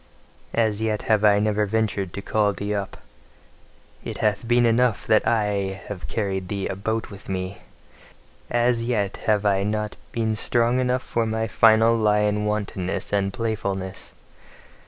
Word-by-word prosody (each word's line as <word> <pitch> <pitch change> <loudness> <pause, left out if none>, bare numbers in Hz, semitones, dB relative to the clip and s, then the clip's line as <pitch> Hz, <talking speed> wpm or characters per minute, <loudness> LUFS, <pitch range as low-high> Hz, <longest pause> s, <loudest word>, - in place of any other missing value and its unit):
As 110 -2 +1
yet 110 -1 -1
have 110 -2 +2
I 105 -1 +6
never 105 0 +1
ventured 105 -3 -1
to 100 - -5
call 105 -2 +1
thee 100 +1 -3
UP; 100 -2 -4 1.1
it - - -5
hath 105 +2 0
been 120 0 +4
enough 115 -1 +2
that 110 -1 +3
I 100 -4 0
have 100 -4 -6
carried 95 -4 -2
thee 100 0 -3
about 110 +4 -3
with 100 0 -11
me! 95 +1 -4 0.9
As 120 0 +2
yet 105 -5 -1
have 105 -1 +2
I 100 -1 +3
not 105 +1 -2 0.2
been 110 -2 -1
strong 120 +3 +1
enough 130 0 0
for 115 -1 -1
my 110 0 -1
final 115 +1 +5
lion 105 -1 +2
wantonness 100 -3 -3
and 100 -1 +1
playfulness. 95 -4 -4
105 Hz, 150 wpm, -24 LUFS, 100-115 Hz, 1.1 s, I